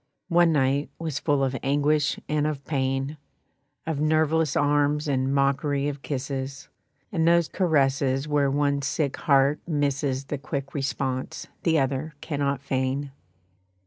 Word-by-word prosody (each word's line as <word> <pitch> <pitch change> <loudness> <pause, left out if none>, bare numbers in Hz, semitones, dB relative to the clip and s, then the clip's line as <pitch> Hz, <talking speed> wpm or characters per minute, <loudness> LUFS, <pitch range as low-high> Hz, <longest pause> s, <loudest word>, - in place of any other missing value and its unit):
One 170 -1 +5
night 140 -1 +1
was 160 -4 -3
full 145 -3 +1
of 135 0 0
anguish 145 +2 +1
and 150 0 +1
of 145 -2 -4
pain, 135 +1 -1 0.7
Of 160 -3 -2
nerveless 155 0 +2
arms 145 +1 +2
and 135 -1 +1
mockery 140 +1 +1
of 145 -1 -4
kisses; 135 -1 -4 0.4
And 165 -5 +1
those 170 -1 +4
caresses 135 -5 +1
where 145 -2 +2
one 140 0 +1
sick 140 0 -1
heart 140 0 +3
misses 140 -3 0
The 145 0 -4
quick 140 0 -5
response 135 -2 -3 0.2
the 165 -2 +2
other 140 +2 -1
cannot 140 -3 -2
feign. 135 +1 -1
140 Hz, 135 wpm, -25 LUFS, 135-150 Hz, 0.7 s, One